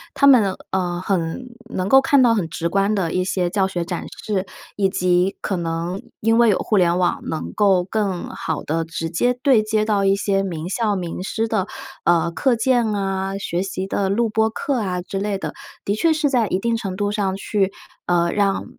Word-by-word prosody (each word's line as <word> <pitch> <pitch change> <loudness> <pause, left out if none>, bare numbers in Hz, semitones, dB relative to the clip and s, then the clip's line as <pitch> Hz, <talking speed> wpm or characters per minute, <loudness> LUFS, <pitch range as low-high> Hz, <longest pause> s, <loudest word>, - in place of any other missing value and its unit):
他 - - +3
们， 225 -9 +6 0.2
呃， 180 -2 -1
很 185 +5 -2 0.3
能 185 +1 -1
够 270 +4 +7
看 285 -1 +4
到 235 - +5
很 185 -7 -1
直 165 0 -2
观 195 +4 +1
的 180 -5 -1
一 185 - +1
些 180 -2 -1
教 195 -1 +2
学 175 -3 -3
展 175 -1 -4 0.2
示， 195 -3 -1 0.3
以 195 -2 +2
及 180 +1 +1
可 195 - -1
能 170 +2 -3 0.2
因 225 +1 +3
为 235 -2 +6
有 195 - +3
互 215 - -1
联 175 -2 +3
网， 180 -1 +1
能 160 - -4
够 195 -4 +3
更 195 -1 -2
好 - - -4
地 165 +2 -1
直 165 0 -5
接 245 +9 +1
对 260 -7 +5
接 215 0 0
到 205 -2 +1
一 195 0 +4
些 200 -1 0
名 170 -4 -4
校 210 +1 0
名 180 -1 -4
师 220 +4 -2
的， 210 -4 -1 0.4
呃， 170 -1 +3
课 240 +9 +1
件 240 0 +2
啊， 195 -1 -2
学 180 -2 -2
习 190 0 -3
的 195 0 -1
录 230 +4 +2
播 220 0 +1
课 260 +3 -2
啊， 185 -4 -2
之 195 +1 -4
类 200 0 -1
的。 - - -5 0.3
的 200 - +1
确 320 +10 +2
是 305 -2 0
在 235 -5 +2
一 185 - 0
定 230 +4 0
程 200 -5 -4
度 205 +1 -1
上 195 -2 -1
去， 195 -1 0 0.4
呃， 170 -1 +2
让 200 -1 +1
195 Hz, 225 characters per minute, -21 LUFS, 180-215 Hz, 0.4 s, 够